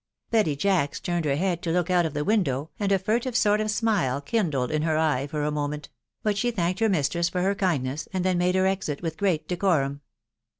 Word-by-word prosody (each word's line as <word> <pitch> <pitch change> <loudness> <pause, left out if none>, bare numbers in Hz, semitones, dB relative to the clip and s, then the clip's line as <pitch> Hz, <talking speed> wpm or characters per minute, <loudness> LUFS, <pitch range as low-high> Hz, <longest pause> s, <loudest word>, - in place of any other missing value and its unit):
Betty 210 -10 +2
Jacks 170 -2 +1
turned 175 -2 -2
her 140 -2 +1
head 175 +1 -1
to 170 - -3
look 175 +1 0
out 175 -2 +3
of 155 - -8
the 150 - 0
window 160 - 0
and 200 -2 0
a 195 - +5
furtive 230 +6 -1
sort 210 -3 +3
of 215 - -1
smile 205 - +1
kindled 145 - -1
in 155 -1 0
her 155 0 +1
eye 150 -4 +1
for 150 0 -3
a 150 - 0
moment; 150 0 -3 0.3
but 210 -1 +1
she 245 - +1
thanked 185 -4 -1
her 225 -1 +3
mistress 170 0 +1
for 180 0 -1
her 195 +1 +2
kindness, 155 -7 -1
and 185 -2 -2
then 185 -1 +2
made 180 +1 +2
her 190 0 +3
exit 190 -6 -1
with 165 -2 -2
great 185 -5 0
decorum. 155 -7 0
175 Hz, 225 wpm, -25 LUFS, 150-195 Hz, 0.3 s, a